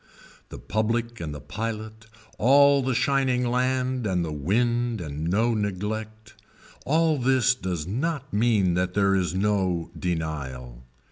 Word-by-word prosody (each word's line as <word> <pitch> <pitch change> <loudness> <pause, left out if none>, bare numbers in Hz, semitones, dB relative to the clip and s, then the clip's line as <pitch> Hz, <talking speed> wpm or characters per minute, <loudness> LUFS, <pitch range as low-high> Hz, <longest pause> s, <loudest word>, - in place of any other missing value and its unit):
The - - -8
public 115 +2 -2
and 75 -4 -7
pilot, 110 0 -5 0.3
all 140 +3 +5
the 130 -1 -1
shining 130 -1 +1
land 130 -1 0
and 90 -3 0
the 80 - -5
wind 120 - 0
and 75 -2 -5
no 115 +6 +2
neglect, 110 +2 -4 0.5
all 160 +1 +2
this 130 -1 +3
does 90 -10 -4
not 135 - -3
mean 105 -4 +2
that 90 +1 -1
there 100 -1 +3
is 95 -2 0
no 95 -4 0
denial. 70 -8 -4
110 Hz, 130 wpm, -25 LUFS, 90-125 Hz, 0.5 s, all